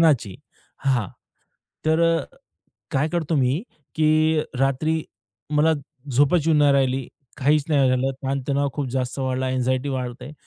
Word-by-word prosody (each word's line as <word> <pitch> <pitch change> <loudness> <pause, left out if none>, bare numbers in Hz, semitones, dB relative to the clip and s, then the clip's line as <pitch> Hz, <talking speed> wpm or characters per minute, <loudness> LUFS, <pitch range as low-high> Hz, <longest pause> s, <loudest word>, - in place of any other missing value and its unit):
ध्यानाची. 135 - +3 0.5
हां. 125 -7 +1 0.8
तर 160 +1 +3 0.2
अ, 145 - -4 0.7
काय 140 +3 +1
करतो 165 -1 -1
मी, 135 +5 +1 0.3
की 155 0 +3 0.2
रात्री 145 +4 +1 0.5
मला 150 +2 +3 0.4
झोपच 145 +5 +3
येऊन 160 -2 +4
नाही 145 -1 +5
राहिली, 135 -2 +1 0.3
काहीच 145 +2 +3
नाही 140 -4 +3
झालं, 130 +1 +1
ताणतणाव 140 +1 0
खूप 145 0 -3
जास्त 130 +1 -2
वाढला. 130 0 -1
अँक्साइटी 130 +1 0
वाढत 125 -2 -4
आहे. 145 - -8
140 Hz, 140 wpm, -23 LUFS, 130-155 Hz, 0.8 s, नाही